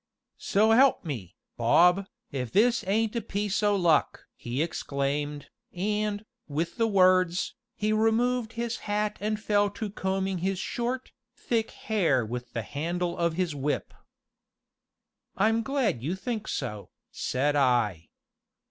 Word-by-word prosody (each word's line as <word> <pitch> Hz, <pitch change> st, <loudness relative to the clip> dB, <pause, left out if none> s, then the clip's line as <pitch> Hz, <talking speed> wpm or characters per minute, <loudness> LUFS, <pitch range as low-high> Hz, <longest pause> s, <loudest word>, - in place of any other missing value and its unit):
"So 215 Hz, +3 st, +3 dB
'elp 260 Hz, -2 st, +5 dB
me, 110 Hz, -, -5 dB, 0.2 s
Bob, 180 Hz, +11 st, +4 dB, 0.2 s
if 125 Hz, -4 st, -3 dB
this 230 Hz, +4 st, +3 dB
ain't 220 Hz, +3 st, +1 dB
a 235 Hz, -, 0 dB
piece 205 Hz, -1 st, -2 dB
o' 205 Hz, -1 st, +3 dB
luck!" 175 Hz, -5 st, +2 dB
he 125 Hz, +5 st, -2 dB
exclaimed, 145 Hz, -1 st, -3 dB, 0.2 s
and, 210 Hz, +2 st, -1 dB, 0.2 s
with 160 Hz, +3 st, -3 dB
the 230 Hz, -1 st, +2 dB
words, 185 Hz, -3 st, +3 dB, 0.2 s
he 215 Hz, 0 st, 0 dB
removed 225 Hz, +2 st, +1 dB
his 235 Hz, 0 st, -3 dB
hat 210 Hz, 0 st, 0 dB
and 215 Hz, 0 st, -1 dB
fell 205 Hz, -1 st, +2 dB
to 205 Hz, 0 st, -5 dB
combing 190 Hz, -1 st, -1 dB
his 190 Hz, +2 st, -1 dB
short, 245 Hz, +6 st, -3 dB, 0.2 s
thick 230 Hz, -2 st, -1 dB
hair 165 Hz, -, +1 dB
with 120 Hz, +2 st, -6 dB
the 115 Hz, -, -2 dB
handle 170 Hz, +7 st, -2 dB
of 170 Hz, -2 st, 0 dB
his 175 Hz, -2 st, -1 dB
whip. 145 Hz, +1 st, -2 dB, 1.4 s
"I'm 225 Hz, +3 st, +3 dB
glad 240 Hz, -, 0 dB
you 160 Hz, +9 st, -2 dB
think 220 Hz, +2 st, -4 dB
so," 105 Hz, -1 st, -4 dB, 0.2 s
said 145 Hz, +3 st, 0 dB
I. 120 Hz, -, +2 dB
190 Hz, 135 wpm, -28 LUFS, 145-215 Hz, 1.4 s, elp